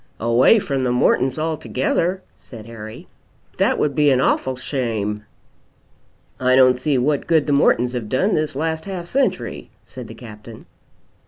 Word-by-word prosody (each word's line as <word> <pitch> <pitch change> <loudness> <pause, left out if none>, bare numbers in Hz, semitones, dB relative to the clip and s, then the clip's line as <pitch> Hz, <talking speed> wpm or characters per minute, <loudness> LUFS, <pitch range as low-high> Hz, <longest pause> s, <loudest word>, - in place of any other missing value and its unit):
"Away 115 - +4
from 140 -10 -2
the 125 - 0
Mortons 130 +2 +2
altogether!" 160 +3 -1
said 110 -4 -12
Harry. 110 -1 -10 0.5
"That - - +2
would 145 - 0
be 150 0 +3
an 130 -2 +3
awful 130 0 +1
shame!" 110 -6 -3 1.1
"I 130 0 +3
don't 130 -1 +5
see 140 +1 0
what 140 +3 0
good 160 -3 +3
the 145 - 0
Mortons 125 -3 +3
have 115 -4 -4
done 190 +11 +1
this 155 -3 -1
last 160 +2 -2
half 185 -3 -5
century," 210 -2 -2 0.2
said 125 0 -10
the - - -10
Captain. 110 -1 -12
130 Hz, 155 wpm, -20 LUFS, 120-155 Hz, 1.1 s, don't